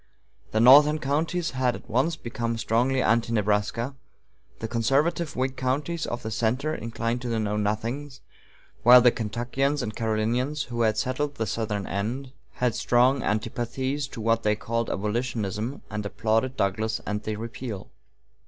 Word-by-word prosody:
The 110 - 0
northern 145 +6 +8
counties 155 +4 -1
had 130 -2 0
at - - -11
once 135 +9 +1
become 115 -3 -3
strongly 125 +4 +1
Anti 115 0 +2
Nebraska; 105 +4 0 0.6
the 110 - -4
conservative 140 +8 +1
Whig 130 +1 -1
counties 145 +6 -1
of 120 0 -4
the 110 - -4
center 125 +8 0
inclined 115 -2 -3
to 125 - -4
the 115 - 0
Know 105 -1 -1
Nothings; 115 +7 -2 0.6
while 125 +1 +9
the 120 0 +6
Kentuckians 125 +6 -1
and 105 -2 -4
Carolinians, 115 +6 0
who 120 -1 -2
had 110 -2 +2
settled 140 +5 -1
the 115 - -1
southern 105 -1 -2
end, 120 +8 -3 0.2
had 125 -2 0
strong 125 +4 +3
antipathies 125 +6 -2
to 130 -4 -8
what 115 +1 +2
they 105 -1 +2
called 115 +2 -2
abolitionism, 110 +2 -2
and 105 0 -3
applauded 115 +5 0
Douglas 110 +3 0
and 105 0 -2 0.2
repeal. 115 -2 -6
120 Hz, 150 wpm, -26 LUFS, 110-130 Hz, 0.6 s, while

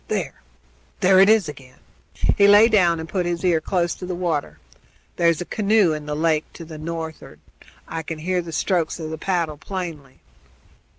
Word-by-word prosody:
There! - - -3 0.6
there 185 0 +5
it 195 +2 +6
is 215 -6 +4
again!" 135 -3 -11 0.6
He 200 - +5
lay 205 +3 +7
down 175 -6 +3
and 160 - -6
put 180 0 -2
his 175 +1 -2
ear 170 -3 +2
close 175 +1 -1
to 180 - -8
the 180 - -3
water. 170 -5 -2 0.6
"There's 170 -2 +2
a - - -4
canoe 210 -4 +2
in 150 -1 -6
the 150 - -3
lake 155 0 +1
to 165 - -10
the 155 -1 -10
north'ard. 160 0 -7 0.5
I 165 - -4
can 160 0 -6
hear 180 +3 -1
the 170 -1 -9
strokes 170 +1 -1
of 155 -1 -5
the 160 - -6
paddle 170 -5 -1
plainly." 160 -6 -7
170 Hz, 185 wpm, -22 LUFS, 155-185 Hz, 0.6 s, lay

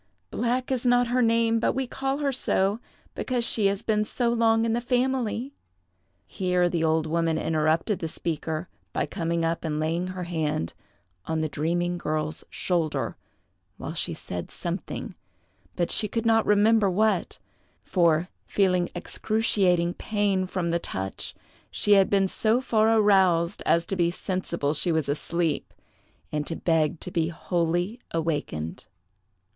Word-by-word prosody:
Black 250 +2 -1
is 255 -2 0
not 245 -1 +3
her 250 +1 +2
name, 230 -1 +3
but - - +1
we 265 0 -1
call 270 +2 -2
her 285 -2 0
so 205 -5 +1 0.3
because 245 -2 -1
she 210 -4 +2
has 200 +2 -1
been 215 -1 +2
so 235 +2 -1
long 225 -1 +3
in 225 - +1
the 240 - 0
family." 250 0 0 0.7
Here 180 - +1
the 170 -2 -1
old 160 0 +2
woman 165 0 +1
interrupted 160 +6 +1
the 165 - -3
speaker 160 +1 -3 0.3
by - - 0
coming 165 +2 -1
up 165 0 -1
and 155 -2 -2
laying 165 +3 -1
her 185 0 -5
hand 155 - -2 0.5
on 160 -1 0
the 155 - 0
dreaming 175 +4 -1
girl's 155 -1 -2
shoulder, 170 -4 -1 0.6
while - - -5
she - - -2
said 90 -1 -6
something; - - -5 0.6
but 175 - 0
she 210 - +3
could 230 +2 -2
not 225 -1 +3
remember 210 0 +4
what, 205 0 +1 0.5
for, 170 -2 +2 0.2
feeling 180 -3 +2
excruciating 190 -6 +1
pain 200 -3 0
from 180 -2 -2
the 170 - +1
touch, 95 - -5 0.3
she 210 - -1
had 195 -2 +6
been 195 -1 +3
so 220 +5 +1
far 225 -4 +2
aroused 190 -4 +3
as 170 0 +3
to 195 - -3
be 170 -2 +2
sensible 170 -5 -2
she 170 +3 -1
was 160 -3 0
asleep, 160 +2 -1 0.6
and 150 -1 -2
to 165 - -3
beg 160 -2 +1
to 180 - -5
be 165 -2 +1
wholly 175 +5 -1
awakened. 150 - -3
180 Hz, 150 wpm, -26 LUFS, 165-220 Hz, 0.7 s, had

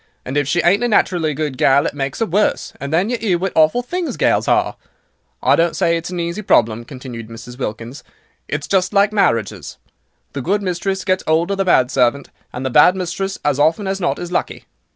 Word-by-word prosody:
And 130 - -5
if 145 -2 +1
she 175 +4 +1
ain't 200 +7 +3
a - - +2
naturally 175 -8 +1
good 150 -3 -3
gal, 140 +1 +4
it - - -2
makes 135 +2 -4
'er - - +1
worse, 205 +3 0
and 140 +1 -5
then 180 +8 +1
you 245 - 0
'ear 195 -6 +1
what 190 +2 -2
awful 160 +10 +3
things 350 +6 -4
gals - - +1
are. - - +1 0.7
I - - +5
don't 170 0 +1
say 170 - +2
it's 165 +1 -4
an 180 -1 -4
easy 170 +4 -3
problem," 115 - +2
continued 125 -4 -9
Mrs. 120 +2 -11
Wilkins, 115 +3 -6 0.4
"it's 145 0 -4
just 185 0 +1
like 200 +1 +3
marriages. 115 - 0 0.6
The 140 - -4
good 200 +8 0
mistress 190 +1 -2
gets 185 0 0
'old 165 +4 +2
of 200 - -1
the 195 - +1
bad 130 -8 +3
servant, 130 +2 +1 0.2
and 125 +2 -6
the 130 - -1
bad 150 +8 +6
mistress, 190 +1 -3
as 145 -1 +1
often 160 +7 +2
as 195 0 -2
not 175 - 0
is 175 0 -6
lucky." - - -3
170 Hz, 215 wpm, -18 LUFS, 135-190 Hz, 0.7 s, bad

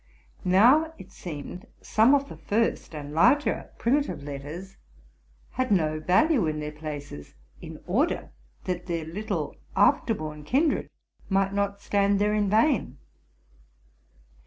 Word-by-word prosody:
Now, 255 - +4
it 190 0 -13
seemed, 180 +6 -8
some 230 +6 +4
of 280 0 0
the - - -9
first 220 -6 -1
and 145 -1 -7
larger 285 - +3
primitive 275 - 0
letters 150 +7 -7 0.7
had 255 0 -1
no 155 -5 +2
value 205 - +3
in 155 0 -2
their 150 0 -4
places, 145 - -8 0.3
in - - -9
order - - 0 0.3
that 180 -1 -4
their 165 -2 -2
little 195 +7 -4 0.2
after 225 - +3
born 155 -3 -7
kindred 280 - +1 0.4
might 195 0 +1
not 200 0 -1
stand 200 0 +2
there 210 +1 +1
in 210 -2 +1
vain. 220 - +2
195 Hz, 130 wpm, -26 LUFS, 155-225 Hz, 0.7 s, Now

